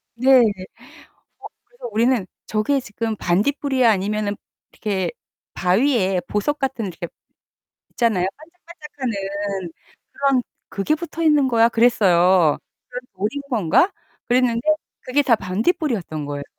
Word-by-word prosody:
네. 260 +2 +5
어 - - +6 1.2
그래서 485 - -10
우리는 230 -1 +2 0.2
"저게 245 +6 0
지금 225 -1 -4
반딧불이야?" 255 +6 +1
아니면은 205 +1 -1 0.4
이렇게 200 -4 -2 0.4
바위에 190 -1 +2
보석 290 +9 -1
같은 255 -6 -2
이렇게 175 -1 -6 0.8
있잖아요. 215 -7 +1
반짝반짝하는 230 - -6 0.4
그런 275 -3 +1 0.3
"그게 200 +10 0
붙어 330 0 -6
있는 295 -4 +4
거야?" 230 -1 +4
그랬어요. 185 -8 +4 0.3
그래서 250 0 -7
'돌인 215 +9 -3
건가?' 235 - +3 0.4
그랬는데 240 -2 +2 0.4
그게 280 +3 +1
다 250 -4 +4
반딧불이었던 210 - -1
거예요. 145 0 -5
230 Hz, 295 characters per minute, -21 LUFS, 195-270 Hz, 1.2 s, 어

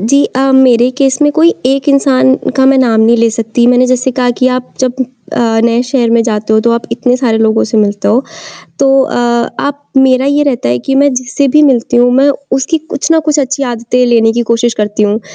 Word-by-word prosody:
जी। 280 +7 +1
अ, 270 +1 +1
मेरे 250 -2 +3
केस 270 0 +1
में 295 - +3
कोई 330 +3 +2
एक 270 +2 -1
इंसान 270 -2 +2 0.2
का 265 -1 +3
मैं 270 0 +3
नाम 230 -4 +2
नहीं 230 +2 +3
ले 230 0 +1
सकती, 225 +1 -1
मैंने 250 +1 +3
जैसे 255 +1 0
कहा 245 -1 +1
कि 255 - +3
आप 250 - -13
जब 260 0 -1 0.3
अ, 225 -1 0
नए 235 +1 +1
शहर 250 -2 -1
में 230 0 +2
जाते 215 -2 -2
हो 220 - +3
तो 235 - 0
आप 235 0 -1
इतने 250 -1 0
सारे 240 -4 -1
लोगों 225 0 +1
से 220 - -3
मिलते 205 -1 -1
हो 240 +5 +1 0.6
तो 275 - +1 0.2
अ, - - -4 0.4
आप 285 0 -4
मेरा 265 0 +3
ये 285 +1 +1
रहता 250 - -2
है 120 +1 0
कि 270 - 0
मैं 280 +1 +2
जिससे 255 +3 -2
भी 300 +4 +3
मिलती 250 -4 +1
हूँ 245 +1 +3
मैं 270 +2 +3 0.2
उसकी 270 +5 0
कुछ 315 -1 -5
ना 325 - +4
कुछ 305 -1 +1
अच्छी 275 +1 -3
आदतें 245 0 -1
लेने 225 -2 +2
की 240 +1 -1
कोशिश 230 0 0
करती 210 -1 -2
हूँ। 210 +1 0
250 Hz, 230 wpm, -10 LUFS, 230-270 Hz, 0.6 s, ना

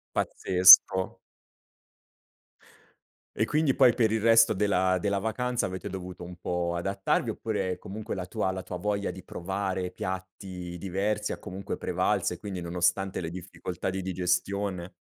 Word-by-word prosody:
Pazzesco. 95 +1 +6 2.2
E 110 - +1
quindi 150 +1 +1
poi 130 -3 +6
per 110 -3 +2
il 110 -1 0
resto 115 0 +6
della 95 -2 +2
della 100 +1 0
vacanza 125 +3 -1
avete 95 +1 -6
dovuto 90 -2 -7
un 90 0 -9
po' 85 -1 -2
adattarvi 95 +3 -1
oppure 100 -5 -2
comunque 105 +2 -6
la 95 -2 -4
tua 95 +1 -2
la 95 -1 -5
tua 90 - -6
voglia 100 0 -2
di 95 0 -11
provare 95 0 -3
piatti 95 -1 -6
diversi 100 +3 -2
ha - - -4
comunque 95 +2 -6
prevalso - - 0
e - - -9
quindi 100 -3 -5
nonostante 90 +3 0
le 80 - -4
difficoltà 90 0 -5
di 95 - -3
digestione 95 +1 -2
95 Hz, 145 wpm, -28 LUFS, 90-100 Hz, 2.2 s, Pazzesco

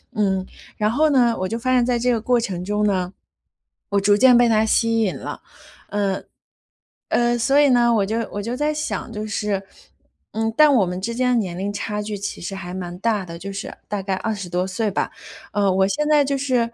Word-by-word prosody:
嗯， 190 -3 +1 0.3
然 210 +1 +1
后 305 +5 +3
呢， 240 -4 +4
我 185 - -1
就 225 - -3
发 255 +1 0
现 245 -2 +4
在 245 -1 +1
这 250 +1 +2
个 230 - +1
过 245 +1 +2
程 185 -6 -3
中 210 +1 0
呢， 185 -2 0 0.8
我 200 0 +2
逐 205 +1 +4
渐 250 +1 +6
被 240 -1 +5
他 220 0 +3
吸 230 +1 +2
引 195 -4 0
了， - - -7 0.5
呃 200 -2 -1 0.9
呃， 240 0 +2
所 275 +5 +3
以 290 - +5
呢， 240 -2 +4
我 205 -3 +2
就 220 +3 -1
我 205 - -3
就 235 +4 -3
在 300 +2 0
想， 300 -6 -4
就 215 0 -4
是 205 -2 -2 0.7
嗯， 225 0 -1
但 300 -2 +6
我 210 -6 +4
们 180 +1 -4
之 230 +4 -3
间 250 -1 +2
年 180 -5 -3
龄 200 +2 -2
差 210 0 -3
距 210 -1 -5
其 200 - -5
实 195 +3 -5
还 180 -1 -7
蛮 175 -1 -6
大 210 -2 0
的， 170 -1 -8
就 195 +3 -7
是 195 - -6 0.2
大 205 -2 -3
概 195 0 -1
20 200 -4 -3
多 180 +2 -1
岁 205 +3 -1
吧。 - - -2 0.4
呃， 200 -2 +2
我 190 +1 +3
现 300 +6 -1
在 295 -2 +5
就 275 0 0
是， 250 -4 +1
215 Hz, 235 characters per minute, -22 LUFS, 195-240 Hz, 0.9 s, 渐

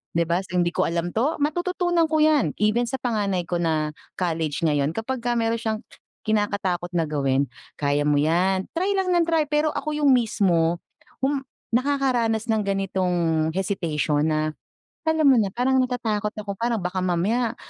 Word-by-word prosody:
'di 170 - +3
ba, 170 +3 0
so 180 -2 -5
hindi 175 -1 +2
ko - - +1
alam 170 +1 -2
'to 265 +8 0
matututunan 350 +1 +1
ko 315 - +1
'yan 305 -2 +3
even 215 +3 +2
sa 265 - -2
panganay 205 -7 -1
ko 175 +1 -2
na 155 -2 0 0.2
college 165 -4 -2
ngayon 145 -2 +2
kapagka 240 +4 -2
meron 230 0 0
siyang 220 -2 -2 0.4
kinakatakot 200 -5 0
na 165 - +2
gawin, 140 -2 +1 0.3
kaya 145 0 +1
mo 150 - +3
'yan 180 +5 +2
try 365 +4 0
lang 375 -1 +1
ng 345 - +4
try 325 -2 +3
pero 300 +1 +1
ako 305 0 -3
yung 290 - +4
mismo 175 -7 +1 0.4
hum 270 0 0 0.2
nakakaranas 245 -3 +1
nang 220 -1 +2
ganitong 180 -5 0
hesitation 160 -6 0
na, 155 0 +1 0.6
alam 320 -1 +2
mo 270 -3 +6
na 200 - 0
parang 255 +5 +1
natatakot 220 -4 -1
ako 210 -1 -5
parang 235 0 0
baka 180 +1 -2
mamaya, 195 +7 0
205 Hz, 165 wpm, -24 LUFS, 170-255 Hz, 0.6 s, mo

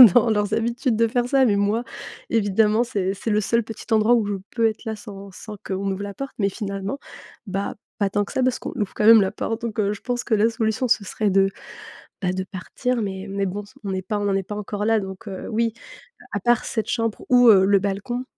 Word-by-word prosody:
dans 235 -1 +5
leurs 210 -1 +1
habitudes 235 +2 0
de 230 +1 +3
faire 245 +1 0
ça» 270 0 +4
mais 210 -4 +3
moi, 205 +4 +1 0.5
évidemment, 215 +1 +3
c'est 195 -5 -1
c'est 210 +3 -4
le 210 +1 +3
seul 230 +3 +1
petit 220 0 -9
endroit 220 +2 +5
où 225 -3 +1
je 205 - -1 0.2
peux 230 -2 +2
être 220 +2 -4
là, 220 - -2
sans 200 -1 -10
sans 210 +3 -9
qu'on 195 +1 -2
ouvre 200 +2 -5
la 200 - -5
porte 275 +5 -6
mais 200 -1 +2
finalement, 200 +5 -4 0.5
bah, 195 +1 -3 0.2
pas 200 - +2
tant 205 +1 +1
que - - -10
ça 260 - +1
parce 255 -1 +1
qu'on - - -5
ouvre 205 - -2
quand 210 - 0
même 225 0 +9
la 190 0 +1
porte 225 +2 -3
donc 225 -2 -4
heu, 200 0 +2
je - - -9
pense 245 -1 -2
que - - -1
la 215 +2 +3
solution, 225 +2 0
ce 215 - +3
serait 210 +2 -1
de, 195 0 +4 0.7
bah, 180 - +1
de 190 0 -2
partir, 235 +7 -3
mais 190 -1 -4
mais 200 0 -1
bon 200 +3 -3
s 205 - -19
on 200 - -3
n'est 185 - -2
pas 205 +3 -2
on 205 - -2
n'en 200 - +1
est 195 - 0
pas 210 +3 -6
encore 205 0 -3
là 225 -1 +4
donc 190 +1 -8
heu, 190 - -6
oui, 230 0 +1 0.5
heu, - - -16
à - - -1
part 240 -1 +2
cette 220 - -2
chambre 230 -3 -1
ou 245 -1 +7
heu, 190 -3 +7
le 200 0 +5
balcon, 205 +6 -2
210 Hz, 255 wpm, -23 LUFS, 200-230 Hz, 0.7 s, même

